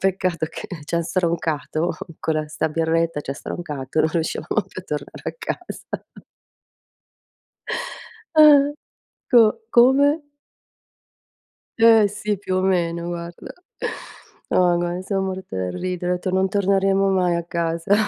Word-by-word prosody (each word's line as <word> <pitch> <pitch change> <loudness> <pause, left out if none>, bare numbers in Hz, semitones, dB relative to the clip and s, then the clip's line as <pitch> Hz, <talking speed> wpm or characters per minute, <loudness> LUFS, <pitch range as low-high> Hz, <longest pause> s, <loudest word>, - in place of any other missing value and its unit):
peccato 185 -4 0
che - - -8 0.2
c'ha 170 +2 -1
stroncato 165 -2 -1 0.3
co 160 0 -1
la 155 -1 -1
sta 155 - -1
birretta, 165 -1 0
c'ha 140 - -4
stroncato, 150 -3 -4
non - - +3
riuscivamo 165 +5 -1
più 185 - -8
a 185 - -20
tornare 145 -1 -5
a - - -3
casa. 450 - -6 2.3
Ah-ah, 290 -2 +7 0.6
Co 230 -4 +7 0.2
come? 285 +5 +5 1.5
Ehm, 225 -2 +7
sì, 210 0 -3
più 190 -1 -3
o - - +2
meno, 170 -2 0
guarda. 170 0 -7 1.0
No, 180 -1 +4
gua 175 +1 -2
son 195 0 -1
morta 190 - -5
dal 90 -1 -2
ridere. 180 - -2
Ho - - +2
etto: 180 +1 -3
"Non 190 +1 +2
torneremo 195 0 +2
mai 180 -2 +2
a 170 - -2
casa. 170 +2 0
180 Hz, 130 wpm, -22 LUFS, 165-195 Hz, 2.3 s, Ah-ah